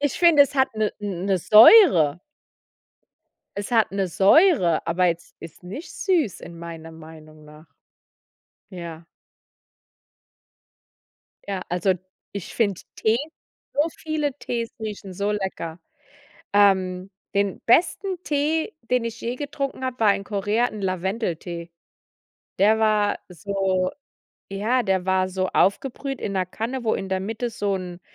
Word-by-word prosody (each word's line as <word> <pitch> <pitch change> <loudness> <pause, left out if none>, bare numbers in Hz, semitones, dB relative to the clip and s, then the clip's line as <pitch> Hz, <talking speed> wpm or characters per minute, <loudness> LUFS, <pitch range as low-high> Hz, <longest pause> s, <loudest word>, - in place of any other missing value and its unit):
Ich 290 -1 -1
finde, 335 -4 +7
es 280 - -3
hat 265 0 +3
'ne 215 -1 0
'ne 195 -1 -1
Säure. 210 - +7 1.4
Es 200 +4 -5
hat 225 -2 +3
'ne 195 -1 -1
Säure, 195 - +4
aber 180 +2 +2
jetzt 170 -1 -3
ist 165 +1 -12
nicht 210 - -8
süß 325 - 0
in 170 - -10
meiner 165 -1 -9
Meinung 155 -1 -14
nach. 150 +2 -15 1.1
Ja. 170 -2 -8 2.4
Ja, 195 -2 -3
also, 180 +2 +1 0.4
ich 200 -3 -7
finde 200 -6 0 0.2
Tee, 220 +1 +2 0.6
so 295 +3 +1
viele 300 -3 -2
Tees 235 -4 -3
riechen 210 -3 -6
so 200 +2 -1
lecker. 190 -5 -4 0.7
Ähm, 190 -2 +2 0.2
den 200 -1 0
besten 355 - +2
Tee, 310 +7 0 0.2
den 250 -2 +2
ich 230 -1 -5
je 240 +2 -3
getrunken 280 -2 -4
habe, 255 -1 -4
war 210 -3 +5
in 195 0 -5
Korea 205 +4 0
'n 215 -3 -8
Lavendeltee. 180 -3 -3 0.9
Der 215 +3 +4
war 215 -2 +2
so 190 0 -1 0.6
ja, 215 +6 0
der 190 -3 0
war 190 0 +2
so 185 0 -1
aufgebrüht 270 +6 0
in 200 - -3
'ner 185 -1 0
Kanne, 235 +7 -4
wo 220 - +1
in 190 - -4
der 190 0 0
Mitte 225 +5 -3
so 205 -4 -2
'n 180 -2 -7
200 Hz, 135 wpm, -23 LUFS, 180-240 Hz, 2.4 s, finde